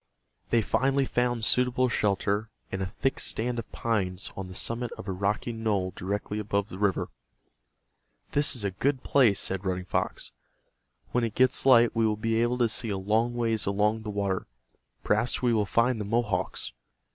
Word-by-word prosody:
They 115 Hz, -2 st, +3 dB
finally 135 Hz, +5 st, +2 dB
found 120 Hz, -3 st, 0 dB
suitable 125 Hz, +1 st, +3 dB
shelter 105 Hz, -1 st, 0 dB, 0.2 s
in 95 Hz, -, -3 dB
a 95 Hz, -, -1 dB
thick 135 Hz, +8 st, -1 dB
stand 120 Hz, +1 st, 0 dB
of 115 Hz, -, -8 dB
pines 100 Hz, -5 st, -2 dB
on 95 Hz, -1 st, -5 dB
the 90 Hz, -, -10 dB
summit 115 Hz, +3 st, -2 dB
of -, -, -9 dB
a -, -, -1 dB
rocky 100 Hz, +5 st, -1 dB
knoll 105 Hz, -5 st, -1 dB
directly 105 Hz, +2 st, -3 dB
above 100 Hz, 0 st, -1 dB
the 95 Hz, -, -8 dB
river. 100 Hz, -2 st, +1 dB, 1.2 s
"This 145 Hz, -1 st, +3 dB
is 115 Hz, -, -3 dB
a 100 Hz, -, 0 dB
good 130 Hz, +7 st, -1 dB
place," 115 Hz, -8 st, +4 dB
said 95 Hz, 0 st, -2 dB
Running 90 Hz, -1 st, -2 dB
Fox. -, -, -2 dB, 0.8 s
"When 120 Hz, -, +1 dB
it 115 Hz, -2 st, -2 dB
gets 130 Hz, +1 st, +3 dB
light 120 Hz, -3 st, +6 dB
we 115 Hz, -1 st, +3 dB
will 105 Hz, -1 st, 0 dB
be 115 Hz, +1 st, 0 dB
able 120 Hz, +1 st, +1 dB
to 120 Hz, -1 st, +3 dB
see 115 Hz, +1 st, -3 dB
a 100 Hz, -, -1 dB
long 110 Hz, +5 st, +1 dB
ways 115 Hz, -3 st, 0 dB
along 105 Hz, +3 st, +1 dB
the 110 Hz, -, -6 dB
water. 100 Hz, -2 st, -2 dB, 0.6 s
Perhaps 110 Hz, +5 st, +1 dB
we 120 Hz, -1 st, +3 dB
will 105 Hz, -3 st, +1 dB
find 115 Hz, +2 st, +2 dB
the -, -, -3 dB
Mohawks." 105 Hz, -, -1 dB
110 Hz, 180 wpm, -28 LUFS, 100-120 Hz, 1.2 s, light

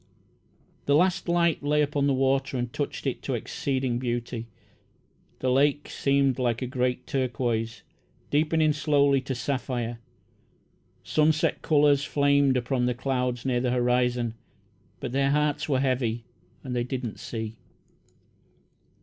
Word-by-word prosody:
The 140 Hz, -, +4 dB
last 180 Hz, +2 st, +2 dB
light 170 Hz, -1 st, +2 dB
lay 150 Hz, +1 st, +2 dB
upon 145 Hz, -1 st, 0 dB
the 140 Hz, -, +3 dB
water 135 Hz, 0 st, +1 dB
and 120 Hz, -1 st, -3 dB
touched -, -, -4 dB
it -, -, -2 dB
to -, -, -2 dB
exceeding 130 Hz, -3 st, -2 dB
beauty. 120 Hz, -1 st, -3 dB, 0.9 s
The 130 Hz, -, +1 dB
lake 145 Hz, +2 st, +2 dB
seemed 140 Hz, -1 st, +1 dB
like 120 Hz, 0 st, 0 dB
a -, -, -1 dB
great 125 Hz, 0 st, -1 dB
turquoise, 120 Hz, -3 st, -2 dB, 0.5 s
deepening 155 Hz, +1 st, +3 dB
slowly 145 Hz, -3 st, +3 dB
to 130 Hz, 0 st, -4 dB
sapphire. 120 Hz, -2 st, -3 dB, 1.0 s
Sunset 155 Hz, +1 st, +2 dB
colours 145 Hz, -2 st, +4 dB
flamed 140 Hz, -2 st, +3 dB
upon 125 Hz, 0 st, 0 dB
the 125 Hz, -, 0 dB
clouds 125 Hz, -1 st, -2 dB
near 125 Hz, -2 st, +1 dB
the 125 Hz, -, 0 dB
horizon, 125 Hz, -1 st, +1 dB, 0.7 s
but -, -, -4 dB
their 135 Hz, +1 st, +2 dB
hearts 150 Hz, +1 st, +1 dB
were 135 Hz, -2 st, +2 dB
heavy, 120 Hz, -3 st, 0 dB, 0.4 s
and 125 Hz, -2 st, -4 dB
they 120 Hz, -, +1 dB
did 125 Hz, +1 st, -4 dB
not 115 Hz, -4 st, -5 dB
see. 110 Hz, -2 st, -5 dB
130 Hz, 135 wpm, -26 LUFS, 120-145 Hz, 1.0 s, The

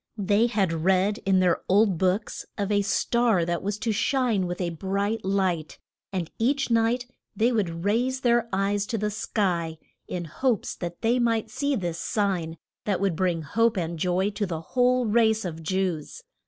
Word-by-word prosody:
They 205 Hz, +3 st, +3 dB
had 200 Hz, -7 st, 0 dB
read 190 Hz, +5 st, +2 dB
in 190 Hz, -1 st, +4 dB
their 180 Hz, -2 st, +2 dB
old 195 Hz, -2 st, +3 dB
books 190 Hz, +3 st, 0 dB
of 205 Hz, -1 st, -1 dB
a 205 Hz, 0 st, +3 dB
star 220 Hz, -2 st, +2 dB
that 170 Hz, 0 st, -1 dB
was 205 Hz, +1 st, -2 dB
to 220 Hz, +1 st, -1 dB
shine 220 Hz, -3 st, +1 dB
with 175 Hz, 0 st, -4 dB
a 175 Hz, -2 st, -1 dB
bright 200 Hz, +6 st, -2 dB
light, 190 Hz, -5 st, -1 dB, 0.3 s
and 180 Hz, -4 st, -3 dB
each 270 Hz, +2 st, +1 dB
night 230 Hz, +2 st, +2 dB, 0.3 s
they 230 Hz, +5 st, +2 dB
would 170 Hz, -7 st, -1 dB
raise 250 Hz, +5 st, +1 dB
their 235 Hz, -1 st, +2 dB
eyes 200 Hz, +1 st, 0 dB
to 230 Hz, -, -2 dB
the 210 Hz, 0 st, -1 dB
sky, 175 Hz, -6 st, -1 dB, 0.3 s
in 175 Hz, -1 st, -4 dB
hopes 230 Hz, -, -1 dB
that 175 Hz, -1 st, -6 dB
they 235 Hz, +2 st, +2 dB
might 230 Hz, -2 st, 0 dB
see 280 Hz, +3 st, 0 dB
this 175 Hz, -6 st, -3 dB
sign 180 Hz, -6 st, -1 dB, 0.3 s
that 200 Hz, -4 st, 0 dB
would 195 Hz, -3 st, 0 dB
bring 170 Hz, -2 st, 0 dB
hope 230 Hz, +7 st, +1 dB
and 170 Hz, -2 st, -2 dB
joy 185 Hz, +4 st, +1 dB
to 205 Hz, 0 st, -2 dB
the 165 Hz, -3 st, -4 dB
whole 250 Hz, +6 st, +2 dB
race 220 Hz, -1 st, +3 dB
of 165 Hz, -2 st, -5 dB
Jews. 180 Hz, -2 st, -2 dB
200 Hz, 180 wpm, -26 LUFS, 180-225 Hz, 0.3 s, in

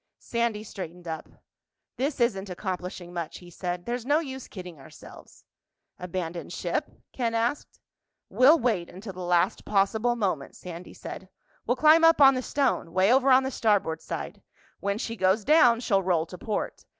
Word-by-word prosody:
Sandy 235 Hz, -3 st, -2 dB
straightened 180 Hz, -4 st, -8 dB
up. 160 Hz, -1 st, -5 dB, 0.7 s
"This 275 Hz, +2 st, -2 dB
isn't 205 Hz, -5 st, 0 dB
accomplishing 180 Hz, -1 st, -5 dB
much," 170 Hz, -3 st, -5 dB
he 175 Hz, -1 st, -14 dB
said. 175 Hz, 0 st, -4 dB
"There's 240 Hz, 0 st, -3 dB
no 290 Hz, +4 st, +3 dB
use 265 Hz, -5 st, -5 dB
kidding 180 Hz, -5 st, -9 dB
ourselves." 135 Hz, -, -15 dB, 0.5 s
"Abandon 175 Hz, -1 st, -5 dB
ship?" -, -, -2 dB, 0.2 s
Ken 230 Hz, -3 st, -1 dB
asked. 235 Hz, +5 st, -2 dB, 0.5 s
"We'll 280 Hz, +6 st, +6 dB
wait 220 Hz, -, 0 dB
until 195 Hz, +2 st, -9 dB
the 185 Hz, -, -11 dB
last 180 Hz, +1 st, +1 dB
possible 215 Hz, +4 st, +1 dB
moment," 185 Hz, -11 st, -2 dB
Sandy 175 Hz, 0 st, -9 dB
said. 190 Hz, -, -9 dB, 0.4 s
"We'll 245 Hz, -, +2 dB
climb 310 Hz, +4 st, +6 dB
up 330 Hz, -1 st, +6 dB
on 275 Hz, -1 st, +8 dB
the 255 Hz, -, -1 dB
stone—way 220 Hz, -8 st, +1 dB
over 265 Hz, +1 st, +4 dB
on 260 Hz, 0 st, +6 dB
the 265 Hz, -, -2 dB
starboard 200 Hz, -10 st, +1 dB
side. -, -, -6 dB, 0.4 s
When 200 Hz, 0 st, -1 dB
she 230 Hz, 0 st, -4 dB
goes 190 Hz, +1 st, +2 dB
down, 250 Hz, -6 st, +5 dB
she'll 195 Hz, -5 st, +2 dB
roll 175 Hz, -4 st, +1 dB
to 180 Hz, -, -10 dB
port. 210 Hz, +1 st, -4 dB
205 Hz, 160 wpm, -27 LUFS, 180-245 Hz, 0.7 s, on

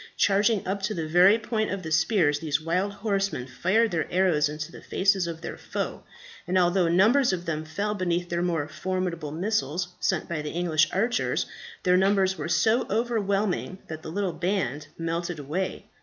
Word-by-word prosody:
Charging 205 Hz, +1 st, +3 dB
up 195 Hz, +2 st, -2 dB
to 210 Hz, +2 st, -2 dB
the 165 Hz, -2 st, -3 dB
very 180 Hz, +6 st, +6 dB
point 220 Hz, -1 st, -2 dB
of 195 Hz, -1 st, -4 dB
the 160 Hz, -, -5 dB
spears, 160 Hz, -2 st, +3 dB
these 150 Hz, -2 st, 0 dB
wild 180 Hz, +5 st, 0 dB
horsemen 200 Hz, -, -1 dB
fired 195 Hz, -, +1 dB
their 165 Hz, -2 st, -2 dB
arrows 175 Hz, -5 st, +3 dB
into 155 Hz, +2 st, -6 dB
the -, -, -11 dB
faces 190 Hz, -2 st, +1 dB
of 165 Hz, -1 st, -6 dB
their -, -, -6 dB
foe, -, -, -4 dB, 0.5 s
and 185 Hz, +1 st, +1 dB
although 180 Hz, 0 st, +3 dB
numbers 220 Hz, +10 st, +4 dB
of 175 Hz, -1 st, -3 dB
them 155 Hz, -2 st, -3 dB
fell 200 Hz, +7 st, -2 dB
beneath 175 Hz, -3 st, -1 dB
the 170 Hz, 0 st, -1 dB
more 165 Hz, -5 st, 0 dB
formidable 175 Hz, -1 st, -3 dB
missiles 175 Hz, -1 st, -1 dB
sent -, -, 0 dB
by 165 Hz, -3 st, -3 dB
the 150 Hz, -, -4 dB
English 160 Hz, -3 st, +2 dB
archers, 230 Hz, +6 st, 0 dB, 0.4 s
their 180 Hz, 0 st, +4 dB
numbers 190 Hz, 0 st, +3 dB
were 170 Hz, -, -5 dB
so 220 Hz, +7 st, +2 dB
overwhelming 205 Hz, -4 st, 0 dB
that 160 Hz, 0 st, -6 dB
the -, -, -7 dB
little 190 Hz, -1 st, -1 dB
band 175 Hz, -6 st, -2 dB
melted 165 Hz, +1 st, -3 dB
away. 155 Hz, +7 st, -3 dB
180 Hz, 180 wpm, -26 LUFS, 160-200 Hz, 0.5 s, very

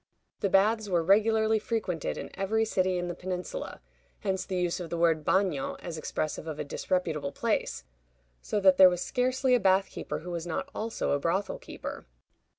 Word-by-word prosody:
The 200 Hz, -, 0 dB
baths 210 Hz, +2 st, +3 dB
were 175 Hz, -3 st, +2 dB
regularly 220 Hz, +3 st, +4 dB
frequented 205 Hz, -7 st, -2 dB
in -, -, -6 dB
every 220 Hz, +3 st, 0 dB
city 185 Hz, -3 st, +1 dB
in 175 Hz, 0 st, -2 dB
the 175 Hz, -, -3 dB
Peninsula 185 Hz, -, -5 dB, 0.4 s
(hence 190 Hz, -3 st, -1 dB
the 185 Hz, -, -3 dB
use 175 Hz, 0 st, 0 dB
of 175 Hz, -2 st, -6 dB
the 170 Hz, -, -3 dB
word 165 Hz, -2 st, +2 dB
bagnio, 185 Hz, -6 st, +1 dB
as 170 Hz, -, -7 dB
expressive 155 Hz, 0 st, -3 dB
of 155 Hz, -2 st, -4 dB
a -, -, -2 dB
disreputable 155 Hz, -1 st, -2 dB
place), 140 Hz, -, -1 dB, 0.6 s
so 210 Hz, -, -1 dB
that 190 Hz, -1 st, +6 dB
there 185 Hz, -1 st, +9 dB
was 180 Hz, -1 st, -2 dB
scarcely 255 Hz, 0 st, +1 dB
a 250 Hz, -, +5 dB
bath 190 Hz, -1 st, +3 dB
keeper -, -, -4 dB
who 175 Hz, +2 st, -7 dB
was 170 Hz, 0 st, -4 dB
not 165 Hz, -, -3 dB
also 225 Hz, +1 st, -2 dB
a 145 Hz, -, +2 dB
brothel 190 Hz, -, -1 dB
keeper. -, -, -8 dB
185 Hz, 185 wpm, -29 LUFS, 170-215 Hz, 0.6 s, there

